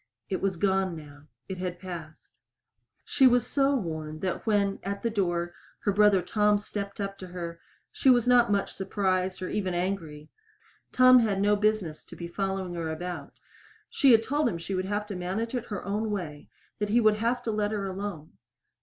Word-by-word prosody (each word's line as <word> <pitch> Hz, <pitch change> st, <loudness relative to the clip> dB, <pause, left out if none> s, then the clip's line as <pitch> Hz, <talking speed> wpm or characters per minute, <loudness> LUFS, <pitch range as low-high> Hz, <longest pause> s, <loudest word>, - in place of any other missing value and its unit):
It 190 Hz, -, -2 dB
was 195 Hz, -2 st, 0 dB
gone 190 Hz, -1 st, +1 dB
now. 145 Hz, -1 st, -12 dB, 0.2 s
It 190 Hz, -1 st, -6 dB
had 180 Hz, -1 st, -3 dB
passed. 170 Hz, -4 st, -9 dB, 0.7 s
She 265 Hz, -, +5 dB
was 245 Hz, -1 st, +3 dB
so 275 Hz, 0 st, +2 dB
worn 160 Hz, -, -4 dB
that 185 Hz, +4 st, -3 dB
when, 200 Hz, -2 st, +2 dB
at 200 Hz, +1 st, -4 dB
the 230 Hz, -, 0 dB
door, 175 Hz, -4 st, -1 dB, 0.3 s
her 205 Hz, -, +1 dB
brother 200 Hz, -2 st, +4 dB
Tom 210 Hz, +2 st, +2 dB
stepped 200 Hz, -1 st, -6 dB
up 195 Hz, -1 st, -4 dB
to 185 Hz, -, -8 dB
her 170 Hz, -2 st, -6 dB, 0.3 s
she 270 Hz, -, +2 dB
was 245 Hz, -3 st, +5 dB
not 245 Hz, -3 st, +5 dB
much 200 Hz, -1 st, 0 dB
surprised 190 Hz, -1 st, -1 dB
or 185 Hz, -, -3 dB
even 190 Hz, -4 st, -1 dB
angry. 170 Hz, -5 st, -3 dB, 0.6 s
Tom 255 Hz, 0 st, +7 dB
had 210 Hz, -4 st, +1 dB
no 205 Hz, +1 st, +3 dB
business 210 Hz, -6 st, 0 dB
to -, -, -12 dB
be 170 Hz, -, -6 dB
following 190 Hz, 0 st, -3 dB
her 165 Hz, -2 st, -3 dB
about. 160 Hz, -2 st, -6 dB, 0.6 s
She 275 Hz, -5 st, +5 dB
had 225 Hz, -1 st, +6 dB
told 290 Hz, +4 st, +1 dB
him 190 Hz, -, -3 dB
that 165 Hz, -, -7 dB
she 195 Hz, -, -4 dB
would 185 Hz, 0 st, -1 dB
have 205 Hz, +2 st, -2 dB
to 205 Hz, -2 st, -6 dB
manage 190 Hz, +7 st, -3 dB
it 245 Hz, -2 st, -2 dB
her 205 Hz, -, -5 dB
own 210 Hz, +2 st, -1 dB
way 160 Hz, -8 st, -5 dB, 0.3 s
that 210 Hz, -1 st, -1 dB
he 230 Hz, +3 st, +4 dB
would 215 Hz, -2 st, +4 dB
have 240 Hz, +3 st, 0 dB
to 230 Hz, -, -1 dB
let 210 Hz, -1 st, 0 dB
her 210 Hz, -2 st, -2 dB
alone. 190 Hz, -5 st, -5 dB
195 Hz, 200 wpm, -28 LUFS, 175-215 Hz, 0.7 s, Tom